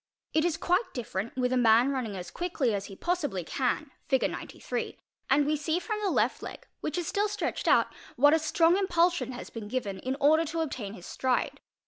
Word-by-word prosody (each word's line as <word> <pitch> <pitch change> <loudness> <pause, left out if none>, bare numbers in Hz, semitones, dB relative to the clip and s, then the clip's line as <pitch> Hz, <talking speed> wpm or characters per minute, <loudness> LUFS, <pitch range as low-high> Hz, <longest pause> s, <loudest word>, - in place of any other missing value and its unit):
It 315 - +3
is 335 -2 +1
quite 360 +7 0
different 225 -3 -4
with 250 0 +1
a - - +3
man 240 +2 +5
running 235 -7 -3
as 180 -1 -7
quickly 330 -9 -1
as 200 -1 -2
he 195 - -9
possibly 290 - -1
can, 265 - -1 0.2
93, 265 - -2 0.3
and 280 +2 +4
we 305 +1 +2
see 315 +3 0
from 425 +3 -3
the 405 - +1
left - - +1
leg, - - -8
which 305 - -3
is 350 - -1
still 405 +6 +1
stretched 410 - -3
out, - - +4 0.2
what 290 +4 +6 0.3
rong 335 +2 +6
impulsion 350 -6 +2
has 245 - -8
been 225 -3 -7
given 205 -5 -3
in 260 +6 -3
order 310 +3 +5
to 330 +1 -2
obtain 230 -9 -4
his 175 - -11
stride. 255 -1 -1
280 Hz, 195 wpm, -29 LUFS, 240-340 Hz, 0.3 s, what